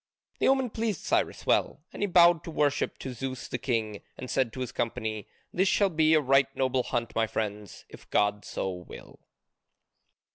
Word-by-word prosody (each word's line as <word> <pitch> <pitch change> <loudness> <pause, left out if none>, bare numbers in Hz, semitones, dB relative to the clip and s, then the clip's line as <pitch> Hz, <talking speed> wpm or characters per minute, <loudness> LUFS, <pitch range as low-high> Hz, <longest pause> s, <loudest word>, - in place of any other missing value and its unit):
The - - +2
omen 265 -3 +2
pleased 220 -6 -2
Cyrus - - 0
well, - - +1
and - - -8
he 205 - +2
bowed 175 -2 +5
in 165 - -7
worship 145 -1 +1
to 130 - -6
Zeus 130 +1 -5
the 125 - -4
King, 110 -4 -2 0.2
and 125 - -6
said 130 -4 +1
to 130 - -6
his 125 - -3
company, 110 -2 -3 0.3
"This 190 +2 +2
shall 200 -1 +3
be 160 -1 +4
a - - +5
right 135 -1 +4
noble 130 -1 +1
hunt, 120 -2 -3
my 110 0 +2
friends, 105 -2 -5
if - - -15
God 105 0 +1
so 95 - -3
will." 90 -1 -11
130 Hz, 185 wpm, -28 LUFS, 110-165 Hz, 0.3 s, bowed